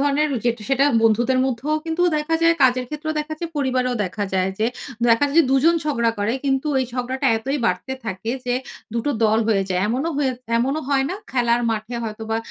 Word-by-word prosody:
ধরনের 290 Hz, +2 st, +2 dB, 0.2 s
যে 240 Hz, -, +4 dB, 0.2 s
সেটা, 270 Hz, +1 st, +3 dB, 0.2 s
বন্ধুদের 240 Hz, +4 st, +3 dB
মধ্যেও 265 Hz, +4 st, -1 dB
কিন্তু 330 Hz, +2 st, -1 dB
দেখা 300 Hz, +2 st, -1 dB
যায়, 335 Hz, 0 st, +5 dB
কাজের 255 Hz, -1 st, +4 dB
ক্ষেত্রেও 305 Hz, +1 st, -4 dB
দেখা 310 Hz, +1 st, -5 dB
যায়, 335 Hz, -1 st, -4 dB
পরিবারেও 255 Hz, -2 st, 0 dB
দেখা 200 Hz, +3 st, -3 dB
যায় 185 Hz, 0 st, +1 dB
যে, 220 Hz, -, +2 dB, 0.4 s
দেখা 230 Hz, +5 st, +4 dB
যায় 290 Hz, -, -3 dB
যে -, -, +8 dB
দুজন 300 Hz, +6 st, +4 dB
ঝগড়া 235 Hz, -6 st, +1 dB
করে। 205 Hz, +2 st, 0 dB
কিন্তু 270 Hz, +2 st, 0 dB
এই -, -, +1 dB
ঝগড়াটা 255 Hz, +2 st, -2 dB
এতই 270 Hz, +6 st, -2 dB
বাড়তে 185 Hz, +9 st, -1 dB
থাকে 220 Hz, +1 st, -4 dB, 0.2 s
যে 245 Hz, -, +1 dB, 0.4 s
দুটো 235 Hz, +5 st, 0 dB
দল 220 Hz, +1 st, +3 dB
হয়ে 200 Hz, -3 st, +3 dB
যায়। 180 Hz, 0 st, +1 dB
এমন 250 Hz, +5 st, -1 dB
হয়ে 275 Hz, -3 st, +1 dB, 0.3 s
এমনও 270 Hz, +6 st, 0 dB
হয় 275 Hz, -1 st, +2 dB
না -, -, -2 dB, 0.2 s
খেলার 240 Hz, -2 st, +2 dB
মাঠে 220 Hz, +2 st, -3 dB
হয়তো 220 Hz, 0 st, -6 dB
বা 225 Hz, -, +1 dB
255 Hz, 200 wpm, -22 LUFS, 225-290 Hz, 0.4 s, যে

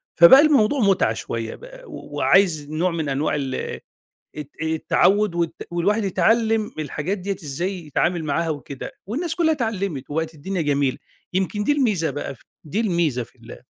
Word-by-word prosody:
فبقى 170 Hz, +12 st, +9 dB
الموضوع 285 Hz, -4 st, +3 dB
متعة 195 Hz, -, +3 dB
شوية 115 Hz, 0 st, -5 dB
بقى، -, -, -13 dB
و 300 Hz, -, -10 dB
وعايز 155 Hz, 0 st, +3 dB
نوع 165 Hz, +4 st, 0 dB
من 160 Hz, -4 st, -2 dB
أنواع 140 Hz, +3 st, 0 dB
ال 135 Hz, -3 st, -2 dB, 0.8 s
الت 150 Hz, -1 st, -6 dB
التعوّد 175 Hz, +5 st, +2 dB
والت 170 Hz, -1 st, -3 dB
والواحد 200 Hz, +6 st, +1 dB
يتعلّم 220 Hz, +2 st, +2 dB
الحاجات 155 Hz, +5 st, -3 dB
ديَّة 195 Hz, +1 st, -3 dB
إزاي 175 Hz, +5 st, -4 dB
يتعامل 170 Hz, +3 st, 0 dB
معاها 160 Hz, +3 st, -1 dB
وكده، 140 Hz, -2 st, -6 dB
والناس 320 Hz, -, -3 dB
كلّها 325 Hz, -2 st, +2 dB
اتعلّمِت 200 Hz, -, -2 dB
وبقِت 160 Hz, +2 st, -2 dB
الدنيا 175 Hz, +4 st, -3 dB
جميلة، 140 Hz, -3 st, +1 dB, 0.4 s
يمكن 190 Hz, +2 st, -1 dB
دي 290 Hz, -, +2 dB
الميزة 215 Hz, -, +1 dB
بقى 145 Hz, 0 st, -5 dB
ف -, -, -26 dB, 0.2 s
دي 165 Hz, +7 st, -3 dB
الميزة 170 Hz, -, +1 dB
في -, -, -19 dB
ال -, -, -13 dB
175 Hz, 160 wpm, -22 LUFS, 150-210 Hz, 0.8 s, فبقى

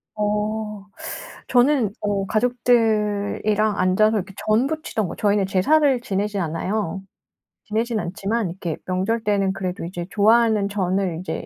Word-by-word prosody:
어. 210 Hz, 0 st, -2 dB, 0.6 s
저는 250 Hz, -4 st, +3 dB
어 200 Hz, -2 st, -1 dB
가족들이랑 215 Hz, -3 st, +1 dB
앉아서 200 Hz, +4 st, +3 dB
이렇게 195 Hz, 0 st, -6 dB
전 215 Hz, +4 st, +3 dB
붙이던 280 Hz, -, -2 dB
거 -, -, -7 dB
저희는 205 Hz, -2 st, +2 dB
제사를 265 Hz, +8 st, +3 dB
지내지 205 Hz, -2 st, -2 dB
않아요. 190 Hz, +3 st, -2 dB, 0.6 s
지내진 225 Hz, +1 st, -1 dB
않지만 200 Hz, +3 st, -2 dB
이렇게 170 Hz, -2 st, -4 dB
명절 190 Hz, +5 st, -1 dB
때는 200 Hz, -2 st, +1 dB
그래도 185 Hz, -3 st, -4 dB
이제 175 Hz, 0 st, -5 dB
좋아하는 220 Hz, 0 st, +3 dB
전을 190 Hz, -3 st, -1 dB
이제 185 Hz, -, -5 dB
210 Hz, 305 characters per minute, -22 LUFS, 190-220 Hz, 0.6 s, 저는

